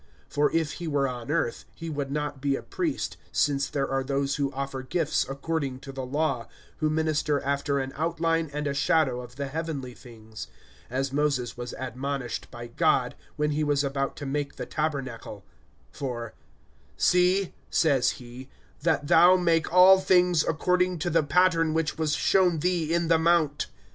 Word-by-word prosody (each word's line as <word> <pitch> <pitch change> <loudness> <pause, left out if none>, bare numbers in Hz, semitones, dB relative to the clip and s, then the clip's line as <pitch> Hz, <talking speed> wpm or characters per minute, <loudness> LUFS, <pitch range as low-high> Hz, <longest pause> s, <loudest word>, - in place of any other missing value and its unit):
(4)For 145 0 +2
if 160 -2 0
he 170 - -6
were 140 -3 +1
on 125 0 -6
earth, 150 -6 -1
he 165 - -7
would 145 -3 -3
not 145 -2 -3
be 140 -1 +1
a - - -6
priest, 330 -6 -3
since 140 -2 +1
there 140 -1 -1
are 135 0 -1
those 140 0 -1
who 140 -2 0
offer 135 -1 -4
gifts 155 +2 0
according 140 -1 -3
to 135 - -8
the 135 -1 -5
law, 135 -2 -1 0.3
(5)who 155 - +2
minister 155 -2 +1
after 140 0 -1
an 135 0 -3
outline 165 0 0
and 150 +1 -3
a 140 - -1
shadow 140 -3 +2
of 125 0 -12
the 140 +1 -3
heavenly 140 -3 -4
things, 110 -3 -11 0.4
as 135 +2 -2
Moses 140 -4 0
was 120 0 -6
admonished 130 +1 -4
by 120 0 -8
God, 120 - +1 0.2
when 150 0 0
he 150 +1 0
was 145 -1 +1
about 135 0 -2
to 145 - -7
make 140 +1 -3
the - - -5
tabernacle; 130 -9 -4 0.5
for, 120 -4 -5 0.6
See, 180 +1 +3 0.2
says 140 -6 +3
he, 125 +2 -11 0.3
that 160 -2 +1
thou 175 +5 +6
make 170 -3 +1
all 185 +2 +8
things 180 -3 +3
according 180 +2 +1
to 175 +2 -2
the 165 +1 +4
pattern 165 +1 +2
which 160 0 -1
was 155 -2 +1
showed 180 -5 +2
thee 175 -2 0
in 170 0 +1
the 165 0 +4
mount. 160 -3 +2
145 Hz, 175 wpm, -27 LUFS, 135-165 Hz, 0.6 s, all